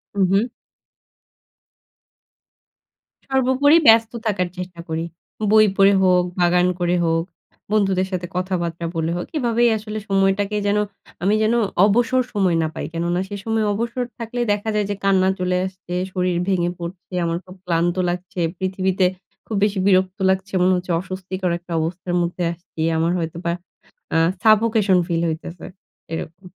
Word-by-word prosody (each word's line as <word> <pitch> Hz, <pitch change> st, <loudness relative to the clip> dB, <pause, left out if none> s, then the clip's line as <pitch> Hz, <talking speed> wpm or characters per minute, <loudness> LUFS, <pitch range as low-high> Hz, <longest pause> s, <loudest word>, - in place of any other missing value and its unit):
উহ। 195 Hz, +5 st, +2 dB, 2.8 s
সর্বোপরি 265 Hz, +4 st, +4 dB
ব্যস্ত 225 Hz, 0 st, +6 dB
থাকার 185 Hz, -4 st, 0 dB
চেষ্টা 180 Hz, -1 st, -7 dB
করি। 160 Hz, +1 st, -2 dB, 0.5 s
বই 215 Hz, 0 st, +7 dB
পড়ে 195 Hz, +1 st, +6 dB
হোক, 180 Hz, -1 st, +4 dB, 0.2 s
বাগান 180 Hz, +1 st, +3 dB
করে 175 Hz, 0 st, +1 dB
হোক, 165 Hz, 0 st, +1 dB, 0.5 s
বন্ধুদের 195 Hz, -3 st, +2 dB
সাথে 180 Hz, -1 st, -3 dB
কথাবার্তা 175 Hz, -2 st, -2 dB
বলে 165 Hz, +1 st, -1 dB
হোক। 175 Hz, -, -3 dB
এভাবেই 240 Hz, -2 st, +2 dB
আসলে 215 Hz, 0 st, -6 dB
সময়টাকে 195 Hz, +1 st, +1 dB
যেন 205 Hz, +1 st, +2 dB, 0.5 s
আমি 205 Hz, +3 st, +3 dB
যেন 220 Hz, +2 st, +2 dB, 0.3 s
অবসর 240 Hz, +4 st, +3 dB
সময় 185 Hz, -5 st, +2 dB
না -, -, 0 dB
পাই। -, -, -4 dB
কেননা 175 Hz, +2 st, -1 dB
সে 205 Hz, -, -5 dB
সময় 225 Hz, -1 st, 0 dB
অবসর 235 Hz, +4 st, -2 dB
থাকলেই 240 Hz, +1 st, -3 dB
দেখা 205 Hz, +2 st, -3 dB
যায় 210 Hz, -1 st, +1 dB
যে, 205 Hz, -, -1 dB
কান্না 190 Hz, -1 st, +3 dB
চলে 180 Hz, 0 st, 0 dB
আসছে, 185 Hz, -1 st, -8 dB, 0.2 s
শরীর 180 Hz, -1 st, 0 dB
ভেঙে 175 Hz, -3 st, +1 dB
পরছে, 175 Hz, +2 st, -8 dB
আমার 170 Hz, 0 st, -1 dB
খুব 185 Hz, +1 st, -12 dB
ক্লান্ত 175 Hz, +1 st, +1 dB
লাগছে, 180 Hz, +1 st, -5 dB, 0.2 s
পৃথিবীতে 190 Hz, 0 st, 0 dB, 0.4 s
খুব 220 Hz, -, -4 dB
বেশি 205 Hz, -2 st, +1 dB
বিরক্ত 185 Hz, -1 st, +2 dB
লাগছে। 190 Hz, +1 st, -1 dB
মনে 185 Hz, +1 st, +4 dB
হচ্ছে 180 Hz, 0 st, -3 dB
অস্বস্তিকর 185 Hz, 0 st, -4 dB
একটা 175 Hz, 0 st, -15 dB
অবস্থার 175 Hz, +2 st, -3 dB
মধ্যে 175 Hz, +1 st, -2 dB
আসছি। 170 Hz, -2 st, -10 dB, 0.2 s
আমার 165 Hz, +2 st, +1 dB
হয়তোবা 170 Hz, +1 st, -3 dB, 0.6 s
অ্যা 165 Hz, -, +1 dB, 0.2 s
সাফোকেশন 215 Hz, -3 st, +4 dB
ফিল 170 Hz, -2 st, -1 dB
হইতেছে, 165 Hz, +2 st, -6 dB, 0.5 s
এরকম। 165 Hz, +4 st, -7 dB
185 Hz, 145 wpm, -21 LUFS, 175-210 Hz, 2.8 s, বই